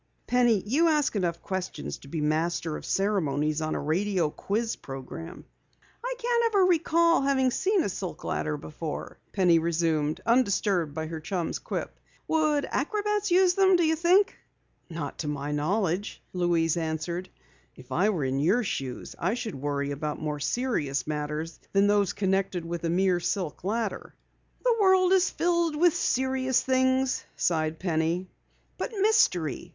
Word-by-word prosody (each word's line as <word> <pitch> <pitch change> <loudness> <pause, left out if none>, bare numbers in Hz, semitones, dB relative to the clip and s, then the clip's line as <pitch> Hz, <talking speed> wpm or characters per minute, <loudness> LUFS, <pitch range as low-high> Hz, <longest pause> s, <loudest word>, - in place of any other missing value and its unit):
Penny, 240 -5 +3
you 290 +10 +3
ask 300 -6 +2
enough 175 -4 -1
questions 180 - -4
to - - -14
be 155 +2 -3
master 160 +1 0
of - - -7
ceremonies 155 -7 0
on 155 0 -1
a - - -1
radio 175 +1 0
quiz 220 +7 -2
program." 135 +6 -8 0.6
"I - - -2
can't 465 -5 +2
recall 335 -1 +3
ever 275 - 0
having 265 -2 +2
seen 385 - +1
a - - -1
silk 185 -1 -5
ladder 150 -1 -2
before," 155 +1 -6
Penny 180 -4 +4
resumed, 160 -2 0
undisturbed 200 - +2
by 160 0 -2
her 160 0 -5
chum's 170 +2 -3
quip. - - -5 0.3
"Would 305 -2 +2
acrobats 420 +6 0
use 360 0 +5
them, 380 0 +4
do 350 - +3
you 320 0 +2
think?" 355 +5 +3 0.5
"Not 160 -4 -6
to 155 - -3
my 145 0 -3
knowledge," 180 +5 -1
Louise 175 -3 +1
answered. 170 +3 -3 0.5
"If 130 +1 -15
I 180 +10 +2
were 175 -9 -1
in 130 +1 -1
your 195 - +3
shoes 135 - -4
I 185 +7 0
should 225 -4 -4
worry 140 +1 -2
about 150 +1 -3
more 150 -1 -3
serious 145 - -1
matters 150 +2 -4
than 200 0 +4
those 205 -2 +2
connected 190 -3 0
with 170 0 -4
a - - 0
mere 180 +1 +2
silk 175 -3 -3
ladder." 215 +2 -3 0.5
"The - - +3
world 375 -1 +5
is 380 0 +4
filled 340 -2 +1
with 340 +2 +4
serious 260 0 +1
things," 260 0 +1
sighed 160 -2 0
Penny. 170 +1 -1 0.5
"But - - -3
mystery! 175 - +2
185 Hz, 155 wpm, -27 LUFS, 155-265 Hz, 0.6 s, use